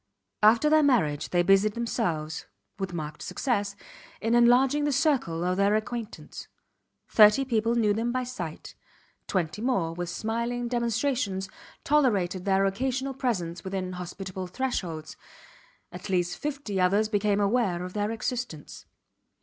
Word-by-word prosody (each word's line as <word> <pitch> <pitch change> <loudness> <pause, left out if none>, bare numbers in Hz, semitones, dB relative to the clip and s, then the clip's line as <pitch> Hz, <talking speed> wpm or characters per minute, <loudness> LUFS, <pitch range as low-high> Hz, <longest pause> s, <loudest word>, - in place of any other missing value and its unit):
After 225 +7 +5
their 310 +1 +5
marriage 155 - +2
they 175 -1 +2
busied 195 +3 +4
themselves, 175 -10 -2 0.3
with 190 -2 -3
marked 155 -3 -6
success, 205 -6 -1 0.4
in 225 +1 0
enlarging 250 +4 +4
the 290 - +1
circle 265 - +1
of 180 +1 0
their 200 +1 +3
acquaintance. 225 0 -5 0.6
Thirty 215 +5 +6
people 230 -2 +1
knew 215 -3 +3
them 230 +3 -1
by 255 +1 -1
sight; 180 -11 -7 0.5
twenty 180 0 -2
more 210 -10 0
with 175 0 -4
smiling 235 +5 -2
demonstrations 235 -4 -1 0.3
tolerated 200 -11 +1
their 195 0 +3
occasional 260 +7 -1
presence 180 -10 -2
within 190 -1 -3
hospitable 185 +1 -6
thresholds; 180 -9 -4 0.7
at 180 +3 -8
least 180 -2 0
fifty 280 -10 -3
others 200 +4 +3
became 205 -1 +1
aware 200 -4 +1
of 180 0 -7
their 205 0 -1
existence. 225 - -5
210 Hz, 135 wpm, -27 LUFS, 180-245 Hz, 0.7 s, Thirty